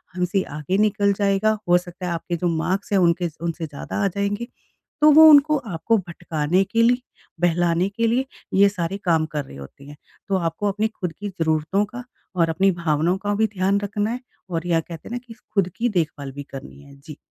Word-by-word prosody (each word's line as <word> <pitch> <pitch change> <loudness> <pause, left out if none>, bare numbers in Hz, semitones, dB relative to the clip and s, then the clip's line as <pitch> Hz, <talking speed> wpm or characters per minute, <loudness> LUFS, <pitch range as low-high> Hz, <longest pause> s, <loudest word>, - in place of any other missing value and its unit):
हमसे 185 +2 0 0.2
आगे 180 +6 -1
निकल 200 -1 +1
जाएगा। 200 +2 +1
हो 175 - +6
सकता 180 +1 -7
है - - -2
आपके 170 +1 -3
जो 175 - -1
मार्क्स 190 +6 -2
हैं 195 - +4
उनके 170 0 +2
उनसे 170 0 -3
ज़्यादा 145 +8 -4
आ - - +4
जाएँगे। 200 +4 -2 0.5
तो 305 - +7
वो 315 +2 +9
उनको 300 +1 +6
आपको 220 -1 0
भटकाने 170 -1 -1
के 230 +4 0
लिए, 245 +2 +3 0.4
बहलाने 175 +1 +2
के 230 +3 0
लिए, 250 +4 +1 0.3
ये 200 +1 +6
सारे 190 0 -3
काम 160 -2 +3
कर 145 -2 -1
रहे 70 - -12
होते 70 - -12
हैं। 145 +1 -11 0.3
तो 195 - 0
आपको 175 +4 -2
अपनी 215 +2 0
खुद 180 -6 -5
की 205 0 -4
ज़रूरतों 165 +3 0
का 245 +4 -9 0.3
और 165 -2 +2
अपनी 190 +4 +3
भावनाओं 160 +4 +1
का 205 - +1
भी 220 +1 +2
ध्यान 195 +2 +2
रखना 205 +2 -2
है 250 - -3 0.3
और 170 0 -3
या 165 -1 +3
कहते 165 -1 -9
हैं - - -11
ना 245 - -2
कि 225 - -9 0.2
खुद 195 -3 +2
की 240 +1 +1
देखभाल 155 - -2
भी 145 0 -7
करनी 135 +1 -10
है। 140 0 -15
जी। 150 0 -11
185 Hz, 210 wpm, -22 LUFS, 165-205 Hz, 0.5 s, वो